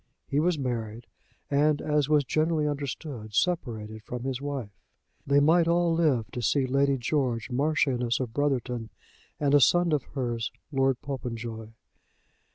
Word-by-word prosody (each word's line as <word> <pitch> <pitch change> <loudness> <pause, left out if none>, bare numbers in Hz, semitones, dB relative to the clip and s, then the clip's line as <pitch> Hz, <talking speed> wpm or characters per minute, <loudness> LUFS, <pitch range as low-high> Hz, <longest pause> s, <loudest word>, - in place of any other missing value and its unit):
He 140 - 0
was 170 +1 +2
married, 115 -4 -4 0.5
and, 145 +1 +3
as 150 -2 0
was 150 -1 +4
generally 155 +2 +1
understood, 140 -6 -5
separated 110 -12 -1
from 120 +3 -6
his 130 -1 -3
wife. 140 -7 -4 0.6
They 140 +1 +5
might 165 +3 +4
all 170 0 +3
live 150 -9 +2
to 125 - -4
see 130 +5 +2
Lady 140 +1 +2
George 125 -3 -1
Marchioness 130 -3 +1
of 125 -4 -4
Brotherton 125 -5 -1 0.5
and 145 -1 +1
a 145 - +7
son 175 +4 +4
of 145 - +2
hers 120 -4 -2 0.2
Lord 135 -2 +2
Popenjoy. 115 -4 -5
135 Hz, 145 wpm, -27 LUFS, 120-150 Hz, 0.6 s, a